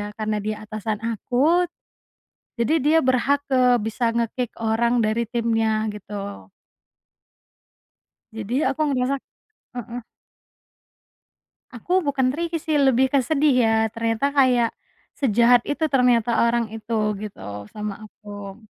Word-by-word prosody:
ya 205 Hz, -, -4 dB
karena 215 Hz, -1 st, -2 dB
dia 215 Hz, +1 st, -3 dB
atasan 215 Hz, 0 st, -4 dB
aku. 275 Hz, -, +1 dB, 0.9 s
Jadi 255 Hz, +6 st, +1 dB
dia 305 Hz, +3 st, +3 dB
berhak, 275 Hz, +3 st, +1 dB
eee, 250 Hz, -1 st, +4 dB
bisa 230 Hz, +1 st, 0 dB
nge-kick 235 Hz, +1 st, -2 dB
orang 230 Hz, +2 st, +1 dB
dari 225 Hz, +1 st, -1 dB
timnya 225 Hz, -2 st, 0 dB
gitu. 200 Hz, -1 st, -8 dB, 1.8 s
Jadi 220 Hz, +2 st, -5 dB
aku 275 Hz, +3 st, -3 dB
ngerasa 260 Hz, -1 st, 0 dB, 0.6 s
heeh. 240 Hz, 0 st, -6 dB, 1.7 s
Aku 350 Hz, -, -1 dB
bukan 270 Hz, -3 st, 0 dB
tricky 335 Hz, 0 st, -2 dB
sih 310 Hz, 0 st, -3 dB
lebih 265 Hz, -1 st, +4 dB
ke 275 Hz, -2 st, +3 dB
sedih 290 Hz, +1 st, +2 dB
ya 225 Hz, -, +2 dB, 0.2 s
ternyata 230 Hz, +4 st, 0 dB
kayak, 250 Hz, -4 st, +3 dB, 0.4 s
sejahat 240 Hz, -2 st, +4 dB
itu 290 Hz, +2 st, -1 dB
ternyata 235 Hz, -2 st, +3 dB
orang 235 Hz, -2 st, -1 dB
itu 220 Hz, -1 st, -1 dB
gitu 210 Hz, -1 st, -8 dB, 0.3 s
sama 210 Hz, -1 st, -5 dB
aku. 205 Hz, -2 st, -10 dB
235 Hz, 120 wpm, -23 LUFS, 220-265 Hz, 1.8 s, eee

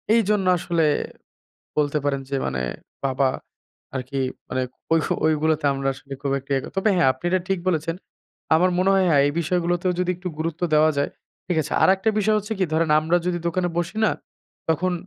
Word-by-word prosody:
এইজন্য 210 Hz, -3 st, +2 dB
আসলে 170 Hz, -1 st, 0 dB, 0.9 s
বলতে 150 Hz, 0 st, +1 dB
পারেন 140 Hz, -1 st, 0 dB
যে 140 Hz, -, 0 dB
মানে, 65 Hz, -1 st, -2 dB, 0.4 s
বাবা 135 Hz, 0 st, +2 dB, 0.7 s
আরকি 135 Hz, +1 st, -3 dB, 0.3 s
মানে 130 Hz, 0 st, -1 dB, 0.3 s
ওইহ 165 Hz, -1 st, +3 dB, 0.2 s
ওইগুলোতে 155 Hz, 0 st, +2 dB
আমরা 135 Hz, 0 st, -2 dB
আসলে 135 Hz, +1 st, -12 dB
খুব 140 Hz, -, 0 dB
একটা 135 Hz, +1 st, -15 dB
ইয়ে 135 Hz, -, +1 dB
ক -, -, -6 dB
তবে, 195 Hz, +3 st, +3 dB
হ্যাঁ, 175 Hz, -6 st, +4 dB
আপনি 130 Hz, -, -22 dB
এটা 185 Hz, 0 st, +2 dB
ঠিক 195 Hz, -1 st, +1 dB
বলেছেন। 165 Hz, -1 st, 0 dB, 0.6 s
আমার 180 Hz, +3 st, +4 dB
মনে 185 Hz, +1 st, +3 dB
হয় 190 Hz, -1 st, +3 dB
হ্যাঁ, 145 Hz, -4 st, +5 dB
এই 145 Hz, -, +1 dB
বিষয়গুলোতেও 175 Hz, +2 st, 0 dB
যদি 180 Hz, 0 st, +1 dB
একটু 180 Hz, +1 st, -5 dB
গুরুত্ব 165 Hz, +2 st, -3 dB
দেওয়া 155 Hz, +1 st, +5 dB
যায়, 140 Hz, -, 0 dB, 0.4 s
ঠিক 180 Hz, -, -1 dB
আছে। 155 Hz, -, -7 dB
আরেকটা 190 Hz, +3 st, +4 dB
বিষয় 215 Hz, +1 st, +3 dB
হচ্ছে 210 Hz, +2 st, -4 dB
কি 190 Hz, -, +3 dB
ধরেন 160 Hz, 0 st, +1 dB
আমরা 165 Hz, +3 st, +2 dB
যদি 175 Hz, -1 st, 0 dB
দোকানে 175 Hz, +1 st, 0 dB
বসি 175 Hz, +4 st, -2 dB
না, -, -, +4 dB, 0.6 s
তখন 180 Hz, +3 st, +1 dB
165 Hz, 185 wpm, -23 LUFS, 145-185 Hz, 0.9 s, হ্যাঁ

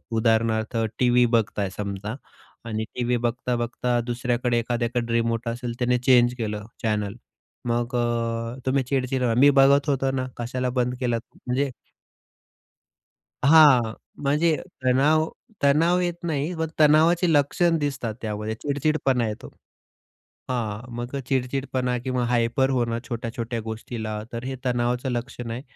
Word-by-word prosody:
उदाहरणार्थ 110 Hz, 0 st, +1 dB, 0.2 s
टी-व्ही 125 Hz, -1 st, +4 dB
बघताय. 110 Hz, -4 st, 0 dB
समजा 100 Hz, +2 st, -4 dB, 0.5 s
आणि 110 Hz, -1 st, -2 dB
टी-व्ही 120 Hz, 0 st, 0 dB
बघता 120 Hz, +1 st, -1 dB
बघता 120 Hz, +1 st, -1 dB
दुसऱ्याकडे 120 Hz, 0 st, 0 dB
एखाद्याकडे 120 Hz, 0 st, -1 dB
रिमोट 115 Hz, 0 st, 0 dB
असेल 120 Hz, +1 st, -3 dB
त्याने 125 Hz, 0 st, +2 dB
चेंज 125 Hz, -1 st, +4 dB
केलं 105 Hz, -2 st, -3 dB, 0.2 s
चॅनल, 105 Hz, -2 st, 0 dB, 0.5 s
मग 120 Hz, +1 st, -1 dB
अ, 115 Hz, 0 st, -1 dB
तुम्ही 130 Hz, 0 st, +2 dB
चिडचिड 130 Hz, 0 st, -1 dB
करता, 120 Hz, -1 st, +2 dB
मी 145 Hz, +1 st, +7 dB
बघत 140 Hz, +1 st, +5 dB
होतो 135 Hz, -1 st, +1 dB
ना, 130 Hz, 0 st, -2 dB
कशाला 125 Hz, +1 st, -2 dB
बंद 125 Hz, 0 st, 0 dB
केला? 120 Hz, -2 st, 0 dB, 0.3 s
म्हणजे, 135 Hz, +2 st, 0 dB, 1.7 s
हां, 140 Hz, -7 st, +6 dB, 0.3 s
म्हणजे 150 Hz, +3 st, +2 dB, 0.3 s
तणाव, 150 Hz, +5 st, +3 dB, 0.4 s
तणाव 165 Hz, +6 st, +4 dB
येत 175 Hz, -1 st, 0 dB
नाही 155 Hz, 0 st, -1 dB
पण 160 Hz, 0 st, -1 dB
तणावाची 160 Hz, +3 st, +5 dB
लक्षण 165 Hz, +4 st, +3 dB
दिसतात 135 Hz, -6 st, -2 dB
त्यामध्ये. 105 Hz, 0 st, -3 dB
चिडचिडपणा 140 Hz, -4 st, +1 dB
येतो. 105 Hz, -, -6 dB, 1.0 s
हां, 120 Hz, -1 st, -3 dB
मग 120 Hz, +3 st, -5 dB
अ, -, -, -1 dB
चिडचिडपणा 130 Hz, -1 st, -1 dB
किंवा 125 Hz, 0 st, -1 dB
हायपर 120 Hz, +2 st, +2 dB
होणं 120 Hz, -3 st, 0 dB
छोट्या-छोट्या 115 Hz, 0 st, -4 dB
गोष्टीला, 110 Hz, -1 st, -5 dB
तर 115 Hz, +1 st, -4 dB
हे 130 Hz, +1 st, -4 dB
तणावाचं 125 Hz, +1 st, 0 dB
लक्षण 120 Hz, -1 st, -4 dB
आहे. 120 Hz, +3 st, -4 dB
125 Hz, 130 wpm, -24 LUFS, 115-135 Hz, 1.7 s, मी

